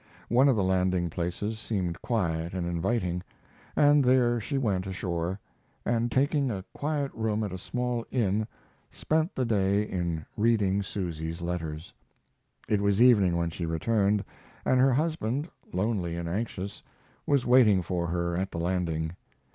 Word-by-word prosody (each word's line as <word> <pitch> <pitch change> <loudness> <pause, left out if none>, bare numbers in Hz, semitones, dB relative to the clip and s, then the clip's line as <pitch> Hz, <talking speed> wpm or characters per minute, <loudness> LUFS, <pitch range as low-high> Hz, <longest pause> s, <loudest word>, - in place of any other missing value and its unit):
One 130 +4 +5
of 130 - +4
the 100 - +1
landing 90 -2 +1
places 90 +6 -3
seemed 95 -6 -3
quiet 85 -6 -1
and 90 -2 -2
inviting, 90 +1 -1 0.5
and 145 -1 +5
there 125 -2 +3
she 140 +6 -3
went 100 -7 0
ashore, 90 0 -3 0.5
and 120 0 +1
taking 140 +1 +2
a 95 -4 -4
quiet 145 -2 -2
room 110 -1 -1
at 105 - -3
a 95 - -5
small 125 +2 -2
inn 110 -3 0 0.4
spent 160 +2 -1
the 130 - 0
day 100 -2 +2
in 85 -6 -3
reading 105 -3 +2
Susy's 85 -5 -4
letters. 85 -2 -4 0.7
It 105 -2 +1
was 100 0 +2
evening 105 -8 +5
when 85 -1 -1
she 85 0 -4
returned, 100 +5 +1 0.4
and 130 - +3
her 130 0 +5
husband, 150 -1 0 0.2
lonely 95 -3 -1
and 85 0 -4
anxious, 100 +1 -4 0.5
was 140 -3 +2
waiting 115 -7 +5
for 85 -1 -2
her 85 0 -1
at 95 +2 -1
the 85 - -5
landing. 85 -2 -1
100 Hz, 150 wpm, -28 LUFS, 85-120 Hz, 0.7 s, One